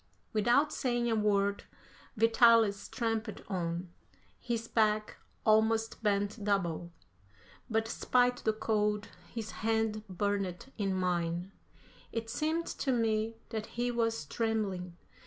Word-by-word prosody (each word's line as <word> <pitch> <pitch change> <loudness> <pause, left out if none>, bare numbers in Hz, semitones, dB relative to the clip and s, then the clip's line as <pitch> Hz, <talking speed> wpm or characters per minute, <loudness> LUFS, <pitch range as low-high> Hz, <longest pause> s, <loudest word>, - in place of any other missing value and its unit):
Without 240 +8 +3
saying 240 -2 0
a - - +3
word, 200 -1 +1 0.5
Vitalis 225 -2 +5
tramped 225 -3 -2
on, 175 -2 -3 0.5
his 230 -1 -3
back 215 -2 +1 0.3
almost 220 +1 +3
bent 205 0 0
double, 175 -4 0 0.8
but 225 0 +1
despite 245 +2 +2
the 220 - +1
cold, 210 -1 0 0.2
his 220 -2 -5
hand 220 -1 +1
burned 200 +3 -2
in 195 -2 0
mine. 175 0 -1 0.6
It 225 -1 -3
seemed 315 +5 0
to 270 - -2
me 225 -2 +1
that 220 -2 -4
he 245 0 +1
was 230 -7 0
trembling. 195 -4 -2
220 Hz, 115 wpm, -32 LUFS, 200-230 Hz, 0.8 s, Vitalis